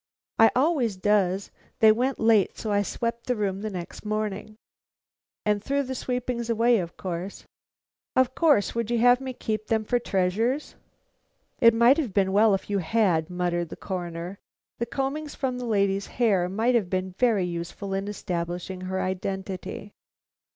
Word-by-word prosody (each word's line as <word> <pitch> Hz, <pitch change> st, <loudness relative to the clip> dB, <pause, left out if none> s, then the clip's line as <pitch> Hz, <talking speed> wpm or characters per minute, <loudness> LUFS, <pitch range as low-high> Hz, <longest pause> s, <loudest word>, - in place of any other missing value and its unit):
"I 225 Hz, -, +8 dB
always 260 Hz, -, +2 dB
does. 195 Hz, -1 st, +1 dB, 0.3 s
They 220 Hz, -1 st, +7 dB
went 250 Hz, +5 st, 0 dB
late, 225 Hz, -4 st, +3 dB
so 215 Hz, -, -3 dB
I 205 Hz, 0 st, +3 dB
swept 235 Hz, +3 st, -3 dB
the 250 Hz, -, +1 dB
room 200 Hz, -3 st, -2 dB
the 215 Hz, -, -3 dB
next 180 Hz, -4 st, -7 dB
morning." 215 Hz, 0 st, -3 dB, 0.9 s
"And 210 Hz, -1 st, +1 dB
threw 280 Hz, 0 st, 0 dB
the 260 Hz, 0 st, -4 dB
sweepings 250 Hz, -2 st, -3 dB
away, 230 Hz, 0 st, +3 dB
of 170 Hz, -2 st, -6 dB
course?" 185 Hz, +1 st, -5 dB, 0.7 s
"Of 260 Hz, 0 st, +3 dB
course; 290 Hz, -11 st, +3 dB
would 235 Hz, -1 st, -2 dB
you 240 Hz, -, +1 dB
have 245 Hz, +2 st, +5 dB
me 265 Hz, -1 st, -4 dB
keep 215 Hz, -3 st, -3 dB
them 220 Hz, -1 st, +1 dB
for 245 Hz, +3 st, +1 dB
treasures?" 220 Hz, +7 st, 0 dB, 0.9 s
"It 230 Hz, -1 st, +6 dB
might 235 Hz, +4 st, +6 dB
have 245 Hz, -11 st, -3 dB
been 190 Hz, -1 st, +2 dB
well 210 Hz, 0 st, +5 dB
if 190 Hz, -, -6 dB
you 200 Hz, -1 st, 0 dB
had," 180 Hz, -3 st, +1 dB
muttered 175 Hz, -1 st, -1 dB
the -, -, -7 dB
Coroner. 175 Hz, 0 st, -5 dB, 0.4 s
"The 235 Hz, -, -1 dB
combings 280 Hz, +4 st, -3 dB
from 255 Hz, -2 st, -2 dB
the 250 Hz, -, -4 dB
lady's 200 Hz, -3 st, +1 dB
hair 200 Hz, -7 st, +1 dB
might 225 Hz, +6 st, +1 dB
have 215 Hz, -7 st, +1 dB
been 185 Hz, 0 st, -2 dB
very 225 Hz, -7 st, +3 dB
useful 175 Hz, +3 st, -5 dB
in 195 Hz, +1 st, -2 dB
establishing 180 Hz, -1 st, -4 dB
her 190 Hz, 0 st, -3 dB
identity." 190 Hz, +2 st, -4 dB
210 Hz, 165 wpm, -26 LUFS, 190-235 Hz, 0.9 s, I